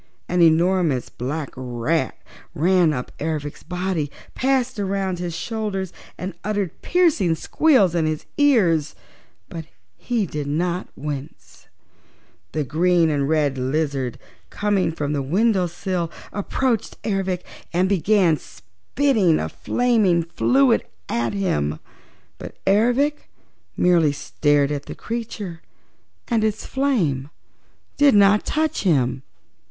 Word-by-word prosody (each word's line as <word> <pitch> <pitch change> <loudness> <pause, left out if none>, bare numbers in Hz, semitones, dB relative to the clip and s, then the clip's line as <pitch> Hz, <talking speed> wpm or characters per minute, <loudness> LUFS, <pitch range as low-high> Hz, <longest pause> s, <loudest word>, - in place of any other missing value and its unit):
An 180 0 +1
enormous 165 -4 +3
black 140 +4 -4
rat 130 +4 -1 0.4
ran 175 +1 +3
up 125 -4 -4
Ervic's 150 -1 -3
body, 180 -4 -2 0.2
passed 260 -3 0
around 195 -2 -1
his 175 -2 -4
shoulders 205 -5 -3 0.2
and 185 +1 -5
uttered 205 -4 -2
piercing 310 - +2
squeals 215 - +3
in 165 -2 +1
his 155 -1 -3
ears, 185 - +3 0.5
but 165 -2 -7 0.3
he 235 -4 -1
did 150 -4 -4
not 175 +5 -1
wince. 145 0 -7 0.8
The 155 - -1
green 165 +3 +2
and 140 -1 0
red 145 -4 +1
lizard, 135 -2 -1 0.3
coming 205 -4 0
from 150 -2 -3
the 145 - 0
window 190 - +2
sill, 175 0 -3 0.2
approached 230 +3 -1
Ervic 190 -3 -1 0.3
and 180 +2 +2
began 190 -3 +3
spitting 220 - 0
a 80 - -2
flaming 215 - +2
fluid 250 +9 +3 0.3
at 120 0 -1
him, 75 - -1 0.6
but - - -9
Ervic 245 +9 +2 0.5
merely 170 -5 +4
stared 145 0 +1
at 145 -1 -4
the - - -6
creature 210 -7 -5 0.7
and 230 -3 +1
its 220 0 -1
flame 180 - 0 0.7
did 285 -5 +5
not 205 +1 +5
touch 310 0 0
him. 135 -8 +1
180 Hz, 115 wpm, -22 LUFS, 150-210 Hz, 0.8 s, did